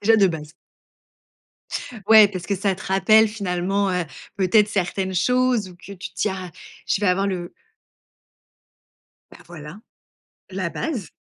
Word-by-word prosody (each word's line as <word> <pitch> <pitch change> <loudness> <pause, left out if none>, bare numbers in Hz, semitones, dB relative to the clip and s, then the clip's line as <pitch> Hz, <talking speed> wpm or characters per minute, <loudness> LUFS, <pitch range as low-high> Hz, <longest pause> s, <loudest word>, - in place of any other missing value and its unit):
Déjà 225 +2 +4
de 200 -2 +5
base. 155 -4 -5 1.6
Ouais, 220 -2 +8
parce 185 -3 -7
que 200 - 0
ça 195 0 0
te 190 - -11
rappelle 215 +3 +4
finalement, 195 -1 -1
heu, 180 -1 -1 0.3
peut-être 200 +2 +3
certaines 190 -1 -2
choses 250 +1 +1
ou 175 - -15
que 200 +2 -12
tu 190 0 -9
tiens, 190 -3 -3 0.4
je - - 0
vais 205 - +1
avoir 190 +2 +1
le 180 -3 -4 1.8
Bah - - -15
voilà, 160 +2 -10 0.7
la 185 -3 -3
base. 245 - -4
195 Hz, 140 wpm, -22 LUFS, 180-210 Hz, 1.8 s, Ouais